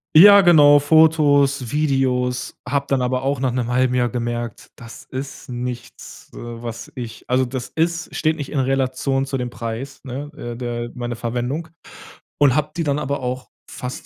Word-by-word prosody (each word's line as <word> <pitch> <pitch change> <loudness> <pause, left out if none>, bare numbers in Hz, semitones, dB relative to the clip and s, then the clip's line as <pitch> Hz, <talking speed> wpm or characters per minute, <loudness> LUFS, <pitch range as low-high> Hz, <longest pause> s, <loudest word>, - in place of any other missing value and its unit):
Ja 200 +4 +10
genau. 150 -5 +7
Fotos, 145 -4 +4
Videos, 130 -4 0
habe 140 +2 0
dann 135 -2 +1
aber 125 +1 -1
auch 140 0 0
nach 130 -1 0
'nem 120 -1 -2
halben 125 0 +2
Jahr 120 -1 +2
gemerkt, 120 -2 -4
das 115 0 -12
ist 135 +1 -7
nichts, 125 0 -7
äh, - - -10
was 115 -1 -7
ich, 120 -3 -8
also, 130 +1 +2
das 125 0 -5
ist 165 +1 -1
steht 155 0 +1
nicht 145 -4 -6
in 145 - -1
Relation 135 0 0
zu 135 0 -3
dem 125 -1 -3
Preis, 120 +3 -6
ne, 135 +3 -6
äh 120 0 -6
der, 120 -1 -4
äh, 120 - -6
meine 120 -1 -4
Verwendung. 125 +7 -3 0.7
Und 140 -3 +4
habe 150 0 +1
die 170 - 0
dann 145 -1 0
aber 140 0 -2
auch 125 0 -4 0.2
fast 125 0 -7
130 Hz, 180 wpm, -21 LUFS, 120-145 Hz, 0.7 s, Ja